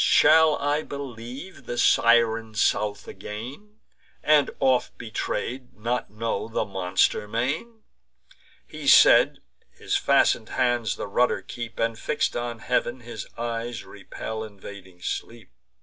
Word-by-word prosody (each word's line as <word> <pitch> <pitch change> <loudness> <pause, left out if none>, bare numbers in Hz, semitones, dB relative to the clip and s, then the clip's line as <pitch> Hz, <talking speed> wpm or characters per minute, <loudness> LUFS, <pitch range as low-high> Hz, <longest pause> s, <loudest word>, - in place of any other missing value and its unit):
Shall 160 -1 +6
I 145 +1 0
believe 135 +2 -8
the 120 - -4
Siren 115 -2 +3
South 105 -1 0
again, 130 - -9 0.4
And, 150 -2 +4
oft 130 -2 +1
betray'd, 120 +3 -4
not 120 +3 -2
know 110 +2 -3
the 115 - -2
monster 95 +2 0
main?" 150 - -3 0.8
He - - -8
said: - - +6 0.3
his - - -4
fasten'd 110 - +2
hands 120 -3 0
the - - -5
rudder 120 +5 +1
keep, 120 -1 -7
And, 115 -1 -1
fix'd - - -1
on 120 -1 -3
heav'n, 125 0 0
his 120 0 -8
eyes 115 0 -4
repel 110 +2 -7
invading 100 -3 -12
sleep. 115 - -5
115 Hz, 120 wpm, -25 LUFS, 110-130 Hz, 0.8 s, Shall